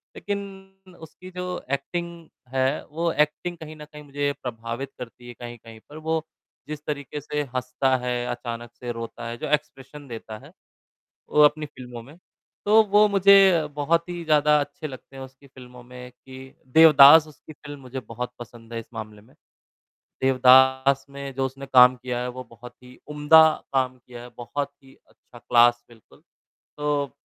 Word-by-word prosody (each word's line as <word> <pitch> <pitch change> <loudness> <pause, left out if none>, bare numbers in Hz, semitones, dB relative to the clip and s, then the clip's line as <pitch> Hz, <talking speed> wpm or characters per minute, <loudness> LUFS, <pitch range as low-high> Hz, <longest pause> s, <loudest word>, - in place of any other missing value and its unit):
लेकिन 190 -2 -8
उसकी 180 +3 -13
जो 180 0 -4
एक्टिंग 170 +3 -4 0.3
है, 130 +1 0
वो 165 +2 -2
एक्टिंग 155 +3 -1
कहीं 155 -1 -10
न 150 -1 -11
कहीं 150 0 -13
मुझे 145 0 -2
प्रभावित 120 +2 -6
करती 120 0 -10
है, 120 - -9
कहीं-कहीं 120 -1 -11
पर 150 - -11
वो 160 0 -2 0.4
जिस 150 0 -8
तरीक़े 145 -1 -5
से 150 +1 -3
हँसता 130 +1 0
है, 125 -1 -3
अचानक 120 -1 -6
से 120 0 -7
रोता 115 0 -7
है, 120 - -6
जो 155 - -5
एक्सप्रेशन 145 -1 -4
देता 115 -2 -8
है, - - -15 0.8
वो 150 - +3
अपनी 150 +1 +3
फ़िल्मों 125 -4 -10
में, 140 +6 -15 0.5
तो 215 +2 +6
वो 210 +1 +6
मुझे 195 -4 +5
बहुत 165 +4 0
ही 175 -1 -5
ज़्यादा 150 -1 +4
अच्छे 145 +2 -5
लगते 135 0 -12
हैं 135 - -8
उसकी 130 +1 -15
फ़िल्मों 125 -2 -14
में 125 0 -11
कि 130 +1 -14 0.2
देवदास 155 -1 +8
उसकी 155 +1 -15
फ़िल्म 145 -1 -11
मुझे 130 0 -7
बहुत 125 +1 -6
पसंद 115 0 -12
है 115 - -3
इस 115 - -10
मामले 110 -2 -8
में, 110 - -23 0.9
देवदास 130 +1 +4
में 140 -1 -8
जो 135 - 0
उसने 135 +1 -7
काम 125 0 +8
किया 125 -1 -5
है 125 - -3
वो 130 +1 -8
बहुत 120 +1 -13
ही 125 0 -15
उम्दा 150 +2 +6 0.3
काम 130 -1 0
किया 120 0 -13
है, 125 - -11
बहुत 140 +4 -4
ही 135 - -19
अच्छा 120 - -19
क्लास 120 0 +3
बिल्कुल, 115 -3 -21 0.6
तो 145 -1 -1
135 Hz, 170 wpm, -24 LUFS, 125-150 Hz, 0.9 s, देवदास